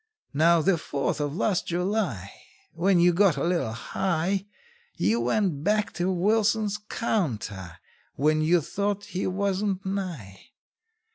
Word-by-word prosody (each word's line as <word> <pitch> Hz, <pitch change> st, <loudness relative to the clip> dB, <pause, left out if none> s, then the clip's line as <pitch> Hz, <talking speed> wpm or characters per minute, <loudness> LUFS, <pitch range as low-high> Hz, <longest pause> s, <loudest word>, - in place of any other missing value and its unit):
How, 165 Hz, +2 st, +4 dB
the 180 Hz, -2 st, +2 dB
Fourth 140 Hz, 0 st, -2 dB
of 145 Hz, 0 st, -2 dB
last 190 Hz, 0 st, 0 dB
July, 175 Hz, -, -1 dB, 0.4 s
When 180 Hz, +2 st, +2 dB
you 175 Hz, +1 st, +5 dB
got 180 Hz, -4 st, +3 dB
a 140 Hz, -, -1 dB
little 170 Hz, -9 st, 0 dB
high, 190 Hz, -, -1 dB, 0.5 s
You 105 Hz, +6 st, +1 dB
went 145 Hz, -, 0 dB
back 210 Hz, +3 st, +1 dB
to 180 Hz, +1 st, -1 dB
Wilson's 210 Hz, +2 st, +1 dB
counter 110 Hz, -, -2 dB, 0.4 s
when 155 Hz, +3 st, +2 dB
you 165 Hz, +2 st, +3 dB
thought 200 Hz, +5 st, -2 dB
he 185 Hz, -, -1 dB
wasn't 195 Hz, 0 st, -1 dB
nigh? 175 Hz, -, -5 dB
180 Hz, 130 wpm, -26 LUFS, 150-200 Hz, 0.5 s, you